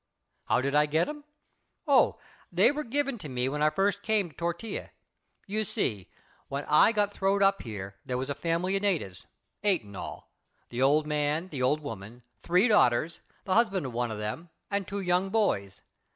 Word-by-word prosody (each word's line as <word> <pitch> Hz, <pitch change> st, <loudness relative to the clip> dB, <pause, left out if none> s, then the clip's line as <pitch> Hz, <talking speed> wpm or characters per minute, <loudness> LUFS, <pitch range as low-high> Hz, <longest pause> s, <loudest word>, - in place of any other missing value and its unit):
"How -, -, +2 dB
did 140 Hz, +1 st, -1 dB
I 150 Hz, 0 st, +4 dB
get 155 Hz, -, +1 dB
'em? 295 Hz, 0 st, -7 dB, 0.6 s
Oh, 280 Hz, -4 st, +4 dB, 0.3 s
they -, -, +5 dB
were 300 Hz, +1 st, -3 dB
given 275 Hz, 0 st, -1 dB
to 155 Hz, -, -7 dB
me 125 Hz, 0 st, -1 dB
when 150 Hz, +2 st, -2 dB
I 155 Hz, -, +5 dB
first 195 Hz, +6 st, 0 dB
came 210 Hz, -6 st, 0 dB
to -, -, -26 dB
Tortilla. 170 Hz, +5 st, -4 dB, 0.6 s
You 215 Hz, +2 st, -1 dB
see, 105 Hz, -, -3 dB, 0.4 s
when 140 Hz, +1 st, -4 dB
I 150 Hz, +8 st, +5 dB
got 205 Hz, -2 st, +1 dB
throwed 200 Hz, +1 st, +2 dB
up 195 Hz, 0 st, +3 dB
here 100 Hz, -4 st, -7 dB
there 125 Hz, -, -3 dB
was 130 Hz, +1 st, -3 dB
a 145 Hz, -, -1 dB
family 170 Hz, +5 st, -1 dB
of 195 Hz, -, 0 dB
natives, 165 Hz, -, -2 dB, 0.4 s
eight 195 Hz, -, +2 dB
in 100 Hz, -1 st, -12 dB
all -, -, -8 dB, 0.4 s
the 120 Hz, +1 st, -3 dB
old 145 Hz, +3 st, +4 dB
man, 150 Hz, +3 st, -1 dB
the 140 Hz, -6 st, -5 dB
old 145 Hz, +4 st, +2 dB
woman, 115 Hz, -2 st, -8 dB, 0.2 s
three 180 Hz, +6 st, +3 dB
daughters, 160 Hz, -, +3 dB, 0.2 s
the 190 Hz, -, -1 dB
husband 200 Hz, -8 st, +2 dB
of 130 Hz, -, -5 dB
one 120 Hz, 0 st, -1 dB
of 110 Hz, -, -4 dB
them 105 Hz, +12 st, -5 dB, 0.2 s
and 200 Hz, -2 st, -1 dB
two 200 Hz, 0 st, -3 dB
young 180 Hz, +1 st, +1 dB
boys. 190 Hz, -, 0 dB
165 Hz, 195 wpm, -28 LUFS, 130-200 Hz, 0.6 s, they